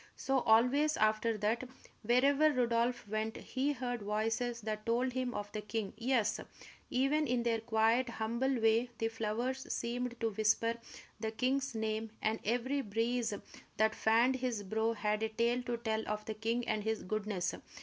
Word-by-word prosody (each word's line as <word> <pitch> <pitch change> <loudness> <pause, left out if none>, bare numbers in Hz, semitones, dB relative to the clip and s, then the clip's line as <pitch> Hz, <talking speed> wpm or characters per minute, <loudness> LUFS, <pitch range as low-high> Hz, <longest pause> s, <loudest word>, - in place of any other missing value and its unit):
So, 270 0 +1
always 255 +7 +4
after 215 +1 +2
that, 215 +4 0 0.4
wherever 275 +6 +4
Rodolph 240 -2 +1
went, 215 +1 -2
he 275 +3 -1
heard 245 -3 -3
voices 225 +3 -1
that 215 0 -3
told 245 +3 +1
him 255 -1 -2
of 205 0 -4
the 215 - -4
king; 210 -1 -3
yes, 235 -1 +1 0.5
even 285 +4 +2
in 245 -1 +1
their 230 -1 +1
quiet, 225 +2 +2
humble 235 +3 -1
way, 225 +2 +3
the 225 - 0
flowers 230 +4 -2
seemed 240 0 -2
to 225 -1 0
whisper 220 +2 +2 0.4
the 220 0 -1
king's 255 +3 0
name, 220 0 -2
and 220 +1 0
every 250 +5 0
breeze 230 +1 0 0.5
that 220 0 +3
fanned 235 +4 +3
his 245 -5 -2
brow 220 +3 0
had 210 0 -1
a 220 - 0
tale 235 +3 +1
to 240 -1 -3
tell 220 -1 -1
of 210 0 -3
the 220 - -3
king 230 +3 -1
and 215 -1 0
his 220 0 -1
goodness. 200 -2 -2
230 Hz, 165 wpm, -34 LUFS, 220-250 Hz, 0.5 s, always